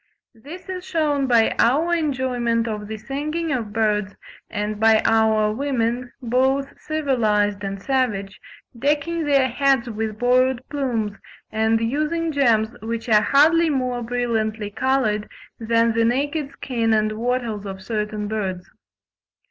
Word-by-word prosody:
This 290 - -11
is 370 -1 -5
shewn 295 -6 0
by 230 -3 +4
our 310 +8 +3
enjoyment 250 -6 0
of 210 -2 -4
the 220 0 -5
singing 300 +7 -3
of 230 -6 -2
birds, 210 -2 0 0.3
and 210 -1 -3
by 220 0 +5
our 220 -1 +3
women, 245 -1 -1
both 265 +3 +1
civilised 215 -9 0
and 195 0 -4
savage, 205 -6 -1 0.3
decking 300 +6 0
their 275 -2 +3
heads 260 -1 +1
with 215 0 -4
borrowed 255 +1 +2
plumes, 235 -8 -2 0.3
and 220 +1 +2
using 305 +8 -1
gems 235 -7 +2
which 230 +1 -4
are 210 -1 +6
hardly 320 +6 +4
more 255 -4 -1
brilliantly 225 -3 -2
coloured 220 -3 0 0.3
than 230 0 +2
the 230 0 +2
naked 280 +5 0
skin 230 -5 -1
and 215 0 +1
wattles 225 -2 -2
of 190 -1 -7
certain 210 -1 -3
birds. 190 -4 -4
235 Hz, 130 wpm, -22 LUFS, 215-275 Hz, 0.3 s, are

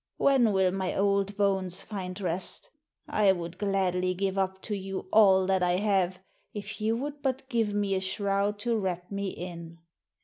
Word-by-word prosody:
When 260 -5 +4
will 190 -2 +3
my 190 -1 -2
old 200 0 +1
bones 190 -3 +1
find 185 -3 -6
rest? 185 - -1 0.4
I 205 -2 +4
would 170 -1 -6
gladly 185 -2 0
give 195 +1 -1
up 190 -1 -1
to 210 - -3
you 195 -1 -5
all 190 -3 +6
that 190 0 +2
I 180 0 +2
have 190 -2 +1 0.4
if 205 +1 -6
you 220 +2 +1
would 285 +3 -5
but 265 -1 -2
give 225 -5 0
me 205 -1 +1
a 190 - 0
shroud 200 +2 0
to 235 +1 0
wrap 180 -2 -3
me 200 0 -2
in.' 170 -2 -8
195 Hz, 175 wpm, -28 LUFS, 185-205 Hz, 0.4 s, all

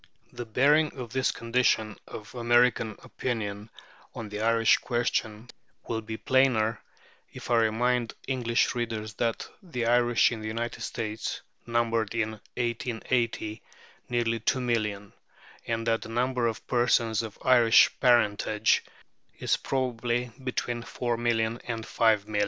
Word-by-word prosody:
The 120 - -6
bearing 145 +7 +3
of 120 -2 -7
this 130 -1 +1
condition 115 -3 +1
of 105 - -9
American 120 -2 +2
opinion 105 -3 -4 0.5
on 110 -2 -6
the 105 +1 -5
Irish 115 0 +4
question 120 -1 -2 0.4
will 115 -1 -2
be 110 0 -6
plainer 120 -5 +2 0.5
if - - -8
I 120 - +5
remind 120 +2 0
English 120 -3 +1
readers 115 -3 -3
that 115 -1 -1
the 145 - -4
Irish 120 0 +4
in 115 -2 -5
the 110 - -5
United 115 +2 -4
States 110 -2 -4 0.3
numbered 115 -2 0
in 110 -1 0 0.3
1880 115 -2 -2 0.5
nearly 115 -1 0
2,000,000, 110 -4 -1 0.6
and 115 0 -2
that 115 -1 +1
the - - -8
number 125 +1 0
of 115 - -4
persons 120 -3 +2
of 110 -3 -8
Irish 120 -3 +6
parentage 110 -3 +3 0.5
is - - +1
probably 125 -2 -2
between 120 -2 -2
4,000,000 120 -1 -1
and 115 -2 -4
5,000,000. 110 -2 +1
115 Hz, 125 wpm, -27 LUFS, 110-120 Hz, 0.6 s, Irish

